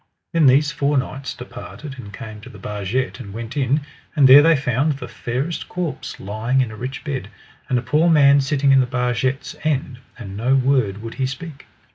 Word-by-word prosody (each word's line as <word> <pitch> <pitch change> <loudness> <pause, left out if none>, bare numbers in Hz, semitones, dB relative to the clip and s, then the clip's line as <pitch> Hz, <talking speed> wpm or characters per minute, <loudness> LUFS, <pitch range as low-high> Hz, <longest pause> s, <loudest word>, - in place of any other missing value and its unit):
Then 165 -4 +5
these 140 +3 +4
four 145 -2 +1
knights 135 +1 -3
departed 125 +3 -9
and 105 -5 -9
came 110 -2 -9
to 125 - -11
the 105 - -12
barget 100 +1 -3
and 100 - -8
went 115 +4 -7
in; 140 +1 +1 0.3
and 140 -4 +6
there 135 +3 +10
they 165 +2 +5
found 140 +2 +1
the 140 - -8
fairest 135 +8 -4
corpse 175 -4 -4
lying 110 +6 -1
in 125 -4 +1
a - - -8
rich 125 +4 -6
bed, 135 -9 -4 0.4
and 125 - +2
a 120 - -2
poor 160 +5 +3
man 140 -3 +6
sitting 140 0 +2
in 135 - +6
the 130 - +2
barget's 125 +2 -1
end, 135 -5 -1 0.2
and 100 -6 -8
no 125 +6 +2
word 125 -6 +1
would 115 - -6
he 130 - +2
speak. 145 +2 -8
130 Hz, 200 wpm, -21 LUFS, 120-145 Hz, 0.4 s, there